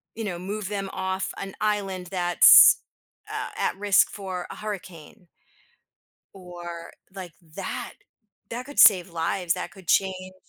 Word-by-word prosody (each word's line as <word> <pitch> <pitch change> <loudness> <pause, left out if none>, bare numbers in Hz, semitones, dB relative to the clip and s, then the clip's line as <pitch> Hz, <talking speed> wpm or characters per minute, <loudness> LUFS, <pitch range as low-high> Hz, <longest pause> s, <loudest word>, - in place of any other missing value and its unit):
you 225 - -5
know, 175 -4 -4
move 200 +1 -5
them 195 -2 -4
off 190 0 -3
an 195 -1 -7
island 195 -4 -2
that's, 175 -1 +7 0.5
uh, - - -4
at - - -1
risk 200 -1 +3
for 185 -3 -6
a - - -9
hurricane 185 -3 -9 1.1
or 175 -2 -9 0.2
like 185 -3 -8 0.2
that, - - -5 0.6
that 245 +2 -6
could 285 - -11
save 185 -3 +6
lives, 170 +1 -1
that 180 - -6
could 190 -4 -17
change 185 0 0
190 Hz, 135 wpm, -24 LUFS, 175-200 Hz, 1.1 s, that's